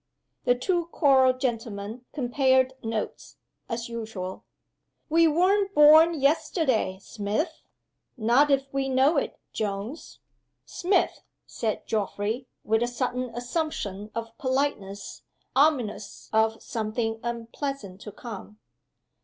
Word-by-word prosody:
The 245 Hz, -, +4 dB
two 345 Hz, +6 st, 0 dB
choral 270 Hz, -6 st, +4 dB
gentlemen 230 Hz, -3 st, -4 dB
compared 260 Hz, -1 st, +2 dB
notes, 225 Hz, -1 st, -4 dB, 0.3 s
as 230 Hz, 0 st, -3 dB
usual. 220 Hz, -5 st, -6 dB, 0.6 s
"We 330 Hz, +1 st, +5 dB
weren't 390 Hz, +5 st, +2 dB
born 310 Hz, +2 st, +7 dB
yesterday, 275 Hz, -, +1 dB
Smith?" 210 Hz, -, -3 dB, 0.6 s
"Not 245 Hz, +6 st, +4 dB
if 275 Hz, -1 st, +3 dB
we 270 Hz, 0 st, 0 dB
know 265 Hz, +4 st, +4 dB
it, -, -, -1 dB, 0.2 s
Jones." 210 Hz, +7 st, -4 dB, 0.5 s
"Smith!" 370 Hz, +2 st, 0 dB, 0.2 s
said 220 Hz, -2 st, -3 dB
Geoffrey, 220 Hz, +3 st, -2 dB, 0.2 s
with 220 Hz, +1 st, +2 dB
a 240 Hz, -, +2 dB
sudden 250 Hz, 0 st, -2 dB
assumption 240 Hz, -, -3 dB
of 230 Hz, 0 st, -5 dB
politeness 260 Hz, -7 st, -2 dB, 0.3 s
ominous 265 Hz, -8 st, +1 dB
of 220 Hz, 0 st, +2 dB
something 225 Hz, 0 st, -2 dB
unpleasant 235 Hz, -3 st, -5 dB
to 210 Hz, -, -8 dB
come. 210 Hz, -1 st, -9 dB
245 Hz, 105 wpm, -26 LUFS, 220-285 Hz, 0.6 s, born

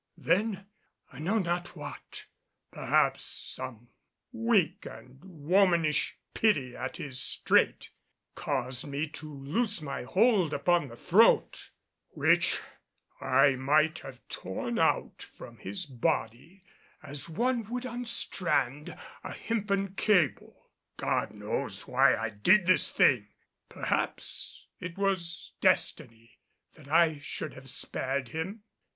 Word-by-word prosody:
Then, 200 Hz, -1 st, 0 dB, 0.5 s
I 130 Hz, -, -11 dB
know 190 Hz, +9 st, 0 dB
not 175 Hz, -3 st, -2 dB
what, -, -, -8 dB, 0.5 s
perhaps -, -, +1 dB
some -, -, -6 dB, 0.4 s
weak 220 Hz, -, +1 dB
and 130 Hz, +1 st, -13 dB
womanish 170 Hz, -2 st, +2 dB, 0.2 s
pity 145 Hz, -, +1 dB
at 130 Hz, -, -5 dB
his 130 Hz, -3 st, -5 dB
strait, -, -, +1 dB, 0.4 s
caused 130 Hz, -1 st, -3 dB
me 145 Hz, +2 st, -2 dB
to 155 Hz, 0 st, -8 dB
loose 180 Hz, -, -1 dB
my 150 Hz, -3 st, -5 dB
hold 185 Hz, -, +2 dB
upon 170 Hz, +1 st, +2 dB
the 115 Hz, -, -11 dB
throat, -, -, +3 dB, 0.4 s
which -, -, +2 dB, 0.6 s
I 135 Hz, +2 st, +4 dB
might 150 Hz, +5 st, +2 dB
have 130 Hz, -4 st, -12 dB
torn 230 Hz, -, -4 dB
out -, -, +1 dB, 0.2 s
from -, -, -11 dB
his 190 Hz, -3 st, -5 dB
body 130 Hz, -, -3 dB, 0.4 s
as 145 Hz, +1 st, -5 dB
one 235 Hz, +5 st, -1 dB
would 250 Hz, +1 st, -4 dB
unstrand 190 Hz, -, 0 dB, 0.3 s
a -, -, -6 dB
hempen 200 Hz, -4 st, -2 dB
cable. 190 Hz, -7 st, 0 dB, 0.3 s
God -, -, 0 dB
knows -, -, -4 dB
why -, -, +4 dB
I 115 Hz, 0 st, -3 dB
did 175 Hz, -, +4 dB
this 185 Hz, -, +4 dB
thing! 115 Hz, -6 st, +3 dB, 0.4 s
Perhaps -, -, -3 dB
it 180 Hz, 0 st, -7 dB
was 185 Hz, -2 st, -2 dB
destiny 125 Hz, -10 st, 0 dB, 0.3 s
that 155 Hz, -4 st, -16 dB
I 160 Hz, 0 st, +3 dB
should 145 Hz, +1 st, -5 dB
have 135 Hz, +1 st, -9 dB
spared 130 Hz, 0 st, -2 dB
him. 190 Hz, -, -5 dB
160 Hz, 115 wpm, -29 LUFS, 135-195 Hz, 0.6 s, I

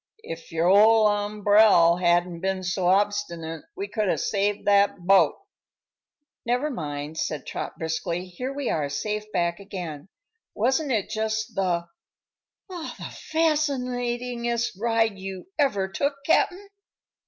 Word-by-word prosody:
If 165 Hz, 0 st, -8 dB
your 165 Hz, +1 st, +1 dB
ol' 215 Hz, +3 st, +6 dB
umbrel 205 Hz, -4 st, +4 dB
hadn't 175 Hz, -1 st, +1 dB
been 190 Hz, +1 st, -2 dB
so 180 Hz, 0 st, -1 dB
obstinate 185 Hz, -5 st, 0 dB
we 395 Hz, +1 st, -3 dB
could 215 Hz, -, -1 dB
have -, -, +1 dB
saved 205 Hz, 0 st, -1 dB
that 200 Hz, -2 st, +3 dB
boat." 190 Hz, -4 st, +5 dB, 1.1 s
"Never 250 Hz, +6 st, 0 dB
mind," 150 Hz, -, -5 dB
said 150 Hz, -4 st, -3 dB
Trot, -, -, -5 dB
briskly; 170 Hz, +2 st, -3 dB
"here 250 Hz, +9 st, -5 dB
we 280 Hz, -2 st, -4 dB
are 145 Hz, -3 st, -1 dB
safe 210 Hz, +8 st, -3 dB
back 170 Hz, -2 st, 0 dB
again. 180 Hz, -5 st, -7 dB, 0.5 s
Wasn't 265 Hz, +6 st, +1 dB
it 215 Hz, -5 st, -1 dB
jus' 220 Hz, 0 st, -1 dB
the 175 Hz, -5 st, -1 dB, 0.8 s
the 355 Hz, -4 st, -7 dB, 0.2 s
fascinatingest 250 Hz, -6 st, 0 dB
ride 225 Hz, -3 st, +1 dB
you 190 Hz, -, -7 dB
ever 205 Hz, -10 st, +2 dB
took, 280 Hz, +9 st, -1 dB
Cap'n?" 380 Hz, +4 st, +2 dB
205 Hz, 125 wpm, -25 LUFS, 175-240 Hz, 1.1 s, ol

